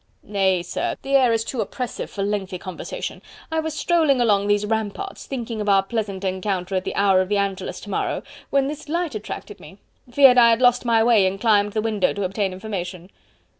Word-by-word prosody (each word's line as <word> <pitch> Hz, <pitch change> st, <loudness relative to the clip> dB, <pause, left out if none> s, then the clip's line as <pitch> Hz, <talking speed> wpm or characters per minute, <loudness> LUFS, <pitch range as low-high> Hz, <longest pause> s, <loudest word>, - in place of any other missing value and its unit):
"Nay, 190 Hz, -3 st, +1 dB
sir, 175 Hz, -, -3 dB
the 275 Hz, -, -5 dB
air 255 Hz, -3 st, +5 dB
is 225 Hz, -1 st, +1 dB
too 235 Hz, 0 st, -3 dB
oppressive 240 Hz, +4 st, -5 dB
for 200 Hz, -, -4 dB
lengthy 195 Hz, -2 st, -2 dB
conversation... 185 Hz, 0 st, -6 dB, 0.3 s
I 320 Hz, -, 0 dB
was 315 Hz, -1 st, -3 dB
strolling 315 Hz, -6 st, +2 dB
along 205 Hz, -4 st, +2 dB
these 205 Hz, 0 st, +2 dB
ramparts, 220 Hz, -, -3 dB
thinking 235 Hz, -4 st, -4 dB
of 205 Hz, -, -1 dB
our 195 Hz, -1 st, +5 dB
pleasant 200 Hz, -2 st, -3 dB
encounter 190 Hz, 0 st, -2 dB
at 185 Hz, -1 st, -1 dB
the -, -, -4 dB
hour 195 Hz, -2 st, +4 dB
of 185 Hz, -, -3 dB
the 205 Hz, -, +1 dB
Angelus 195 Hz, -2 st, -2 dB
to 205 Hz, -, -9 dB
morrow... -, -, -2 dB, 0.3 s
when 275 Hz, -1 st, +2 dB
this 300 Hz, +1 st, -7 dB
light 340 Hz, -1 st, -1 dB
attracted 215 Hz, -1 st, -7 dB
me.... 195 Hz, -, -13 dB, 0.3 s
feared 260 Hz, -1 st, +7 dB
I 235 Hz, -1 st, +7 dB
had 230 Hz, 0 st, +3 dB
lost 245 Hz, 0 st, +3 dB
my 230 Hz, -2 st, +3 dB
way 225 Hz, -5 st, +4 dB
and 195 Hz, +1 st, -3 dB
climbed 205 Hz, -2 st, +3 dB
the 215 Hz, -, 0 dB
window 215 Hz, -4 st, +1 dB
to 200 Hz, -, -3 dB
obtain 195 Hz, +1 st, -1 dB
information." 185 Hz, -2 st, -6 dB
210 Hz, 205 wpm, -22 LUFS, 195-240 Hz, 0.3 s, feared